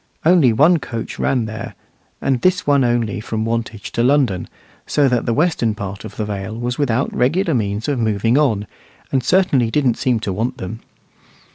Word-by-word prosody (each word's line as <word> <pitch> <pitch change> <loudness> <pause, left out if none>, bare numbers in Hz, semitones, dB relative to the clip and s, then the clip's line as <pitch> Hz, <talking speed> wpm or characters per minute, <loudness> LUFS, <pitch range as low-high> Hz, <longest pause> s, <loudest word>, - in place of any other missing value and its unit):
Only 165 -7 +5
one 155 +9 +4
coach 115 -5 -6
ran 125 -4 +1
there, 110 -1 -7 0.5
and 130 -3 +1
this 185 0 +2
one 140 -2 +3
only 120 -4 0
from 110 0 -3
Wantage 115 -3 -3
to 115 - -1
London, 125 -8 +2 0.4
so 145 -2 +3
that 125 -2 0
the - - +2
western 140 -7 +1
part 100 -1 -6
of 110 -2 -9
the 110 - -2
Vale 105 +1 -5
was 120 +2 -3
without 130 -2 0
regular 165 +7 +1
means 105 -3 -1
of 140 -4 0
moving 110 +1 +1
on, 120 -9 +2 0.5
and 130 -2 +1
certainly 140 -7 +2
didn't 130 -2 +1
seem 125 -4 +1
to 100 - -2
want 120 +6 -2
them. 105 +5 -6
120 Hz, 180 wpm, -19 LUFS, 110-140 Hz, 0.5 s, Only